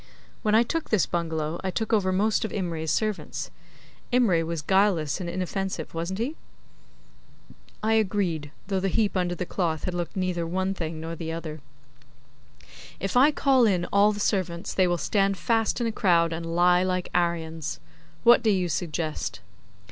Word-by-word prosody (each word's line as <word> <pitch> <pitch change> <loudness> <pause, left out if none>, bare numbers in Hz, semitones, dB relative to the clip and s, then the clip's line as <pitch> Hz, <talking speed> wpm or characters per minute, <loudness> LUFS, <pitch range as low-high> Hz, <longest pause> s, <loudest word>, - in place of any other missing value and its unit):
When 215 0 +2
I 230 - +6
took 325 +6 -3
this 215 -4 +3
bungalow 160 -1 -2
I 190 - -1
took 220 +5 -2
over 190 -4 +3
most 210 +5 +1
of 220 - -2
Imray's 165 -5 -3
servants. 215 +2 -2 0.6
Imray 220 -10 +3
was 165 -1 -4
guileless 190 -5 +2
and 175 - -4
inoffensive, 185 -1 -3
wasn't 170 +3 -3
he?' 250 +8 -2 1.5
I 220 +1 +2
agreed; 190 -8 0 0.2
though 195 -1 -1
the 195 - 0
heap 205 +2 +1
under 175 -1 0
the 180 - -3
cloth 165 -4 -2
had 180 - -2
looked 175 -1 -4
neither 180 -3 -1
one 190 +3 -1
thing 165 -4 -5
nor 165 +1 -5
the 160 0 -5
other. 160 -2 -6 1.4
'If 195 +3 -3
I 265 +4 +7
call 270 -5 +3
in 180 -4 +1
all 200 +1 +5
the 205 - -5
servants 185 -5 -1
they 185 -1 +3
will 175 0 +1
stand 195 +2 +1
fast 225 +2 +1
in 240 - 0
a 230 - 0
crowd 170 -5 +2
and 165 0 -5
lie 180 +1 +5
like 185 -1 -1
Aryans. 165 -3 -1 0.4
What 240 +1 +7
do 225 - +2
you 185 -4 +1
suggest? 160 -2 -3
185 Hz, 170 wpm, -26 LUFS, 165-205 Hz, 1.5 s, I